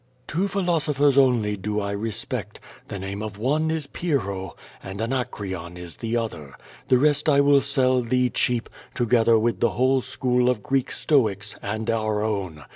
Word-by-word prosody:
Two 180 +6 -1
philosophers 155 -8 +1
only 120 -6 +3
do 105 +2 -2
I 100 -1 -2
respect; 105 +1 -4 0.3
the 100 - -5
name 95 +2 -5
of 105 -2 -6
one 150 +8 +1
is 160 -2 -2
P}Trlio, 100 - -2 0.3
and 95 +1 -8
Anacreon 100 -8 -3
is 90 -2 -8
the 115 +1 -2
other. 80 -12 -5 0.3
The 130 -2 +5
rest 150 +2 +2
I 140 -1 +5
will 140 0 +5
sell 130 -2 +2
tliee 125 +1 +1
cheap, 120 -2 0 0.3
together 115 -1 +3
with 115 +1 0
the 120 - +3
whole 130 +1 +3
school 125 0 +1
of 115 -5 -1
Greek 135 -1 0
Stoics, 105 -8 0
and 110 +2 -4
our 110 -2 0
own. 95 -8 -3
120 Hz, 165 wpm, -24 LUFS, 105-135 Hz, 0.3 s, The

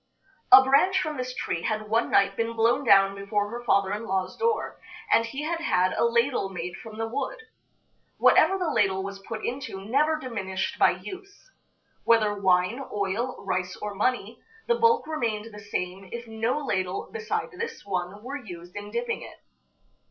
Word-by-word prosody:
A 260 +1 +11
branch 325 +9 +4
from 305 -5 -3
this 255 0 -3
tree 170 - -2
had 215 +2 -2
one 225 +2 +1
night 195 0 +3
been 230 +1 -1
blown 230 +4 +2
down 195 -5 +6
before 205 +1 -2
her 240 +1 -6
father 200 -4 +2
in 225 +2 -4
law's 190 -2 -1
door, 460 -2 -1 0.3
and 230 - +4
he 270 +5 -5
had 330 +2 -2
had 185 - +2
a - - +1
ladle 235 -3 +1
made 180 -1 -5
from 220 -1 -10
the 225 0 -2
wood. 275 - -3 0.8
Whatever 385 - +5
the 355 -4 -1
ladle 190 -5 +1
was 195 0 -6
put 215 +2 -6
into 240 -7 -5
never 295 +8 +2
diminished 205 -9 -4
by - - +6
use. 395 +5 -8 0.5
Whether 220 -3 +4
wine, 190 +5 +1
oil, 205 +4 -2
rice, 185 -1 -2
or 210 -1 -4
money, 225 +2 -1 0.3
the 475 - +4
bulk 460 -1 +3
remained 230 -8 -3
the 210 - -9
same 190 -2 -5
if 235 0 -6
no 225 +3 -1
ladle 185 -4 -2
beside 450 0 -3
this 465 - -6
one 190 +1 -4
were 275 +2 -6
used 175 -3 -10
in 205 0 -6
dipping 475 - -2
it. - - -11
225 Hz, 175 wpm, -26 LUFS, 195-265 Hz, 0.8 s, A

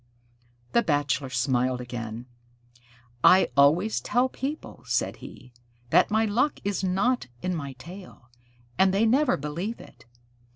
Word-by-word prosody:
The 235 - +4
Bachelor 145 - 0
smiled 125 0 0
again. 120 -1 -6 1.0
"I 190 +1 +6
always 155 +10 +4
tell 250 +2 +1
people," 285 +4 -6
said - - -1
he, 125 -1 -13 0.4
"that - - +5
my 220 +1 +2
luck 235 +8 0
is 200 -1 -2
not 195 - 0 0.2
in 180 0 -1
my 140 -5 -5
tail, 170 -2 -13 0.5
and 190 0 +4
they 215 +3 +3
never 260 +4 +3
believe 170 +10 -4
it. 120 0 -16
180 Hz, 130 wpm, -26 LUFS, -, 1.0 s, I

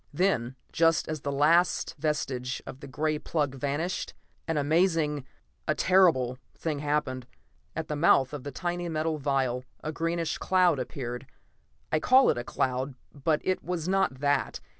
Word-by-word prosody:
Then, 145 -7 +1 0.2
just 165 0 +3
as 155 -2 -4
the 140 - -2
last 160 +5 +3
vestige 135 -4 -1
of 130 - -8
the 140 - -9
gray 150 +3 -1
plug 150 -4 -1
vanished; 145 +7 -2 0.3
an 165 -2 0
amazing, 150 -2 +2 0.4
a - - +2
terrible 160 -10 +3 0.2
thing 155 -3 -3
happened. 145 -4 -1 0.5
At 160 -1 -3
the 150 - -2
mouth 145 -3 +4
of 145 -3 -5
the 145 - -4
tiny 175 +3 -3
metal 155 -1 -1
vial 135 -3 0 0.2
a 155 - -2
greenish 165 0 -1
cloud 180 -6 +3
appeared. 125 0 -5 0.6
I 155 - +3
call 260 +9 +6
it - - -3
a - - -3
cloud, 130 +2 -1 0.2
but 150 +2 0
it 185 - 0
was 175 -2 -3
not 190 -7 +2
that. 145 -1 +1
150 Hz, 160 wpm, -28 LUFS, 135-165 Hz, 0.6 s, call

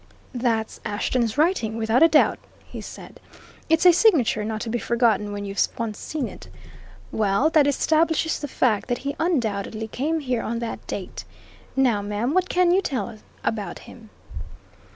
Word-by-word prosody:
"That's 230 -3 -1
Ashton's 230 +3 -1
writing, 295 - +1
without 225 +2 +2
a 330 - +9
doubt," 310 -2 +3 0.3
he - - -8
said. - - -11 0.5
"It's 325 +2 +3
a 355 - +9
signature 295 - +3
not 215 0 -3
to 230 - -4
be 240 - -1
forgotten 220 -3 +1
when 205 0 -5
you've 195 0 -2 0.2
once 225 -3 -4
seen 295 -6 -3
it. - - -11 0.6
Well, 215 +8 +2
that 300 -3 +4
establishes 320 +3 +1
the 290 - -4
fact 235 -6 +1
that 245 - 0
he 280 +1 -2
undoubtedly 220 - -1
came 305 +8 -1
here 250 -4 -1
on 230 +1 -3
that 230 -1 -5
date. - - -6 0.5
Now, 250 -6 +2
ma'am, 210 +6 -2
what 370 0 +1
can 360 -1 +3
you 375 +2 +4
tell 250 - -3 0.3
about 205 -6 -2
him?" 225 -3 -14
240 Hz, 165 wpm, -24 LUFS, 220-310 Hz, 0.6 s, a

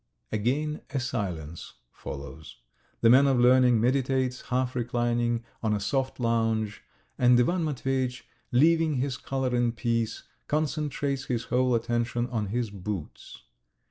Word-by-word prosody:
Again 140 +8 -1
a 135 - -2
silence 90 - -4 0.2
follows. 75 +3 -9 0.5
The 115 - +6
man 135 +3 +7
of 130 -2 +3
learning 125 -1 +5
meditates, 130 +1 +1
half 125 0 0
reclining 120 -1 0 0.2
on 110 -2 +1
a - - -1
soft 130 +6 -1
lounge, 115 -2 0 0.4
and 125 -1 +5
Ivan 170 +8 +2
Matveyitch, 130 -3 -2 0.3
leaving 160 +4 +4
his 130 0 -1
collar 130 -1 -2
in 120 -1 +1
peace, 115 -1 -1 0.2
concentrates 145 -2 -1
his 120 -2 -2
whole 125 0 +1
attention 120 +1 0
on 110 -4 -1
his 115 +1 -2
boots. 100 -3 -7
125 Hz, 130 wpm, -27 LUFS, 115-130 Hz, 0.5 s, man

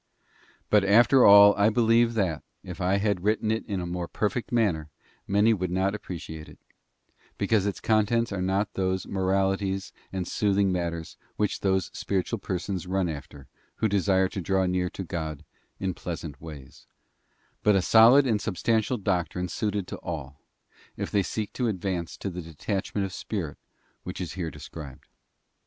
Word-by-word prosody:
But 105 -2 +5
after 120 +6 +6
all 100 0 +9
I 100 +1 +4
believe 115 +1 +3
that, 90 -8 0 0.2
if 90 +1 -8
I 95 +2 +2
had 100 -3 0
written 110 +1 +1
it 110 - -1
in 100 -3 -2
a 90 - -3
more 85 0 -4
perfect 110 +6 -2
manner, 95 -11 +1 0.4
many 105 +3 +4
would 90 -4 -2
not 95 +2 0
appreciate 85 -6 -7
it, - - -15 0.8
because 105 -3 +1
its; 100 - -3
contents 110 +1 +2
are 100 -2 -2
not 95 +3 0
those 95 -1 -1
moralities 95 0 0 0.2
and 95 -2 -3
soothing 100 -2 +1
matters 85 -2 -3 0.2
which 105 -1 -1
those 95 -3 0
spiritual 100 +3 -2
persons 90 -1 -4
run 95 0 0
after 70 -2 -8 0.3
who 110 - +1
desire 95 -2 +2
to 95 - -5
draw 95 +2 +1
near 90 0 0
to 95 - -6
God 80 -4 -5 0.3
in 95 -1 -1
pleasant 80 -5 -6
ways, 75 -5 -11 0.7
but 105 -1 +4
a 95 - +3
solid 115 +8 +7
and 110 -5 +1
substantial 115 +4 0
doctrine 90 -3 -1
suited 105 -2 -2
to - - -6
all, 75 -4 -6 0.6
if - - -4
they 100 - +3
seek 105 +2 -4
to 125 - -1
advance 95 -4 -3
to 100 - -4
that 90 +1 -5
detachment 95 +5 -3
of 95 - -7
spirit 90 -9 -4 0.4
which 90 - -7
is 90 -3 -4
here 85 -4 -3
described. 70 -5 -10
95 Hz, 165 wpm, -27 LUFS, 90-105 Hz, 0.8 s, all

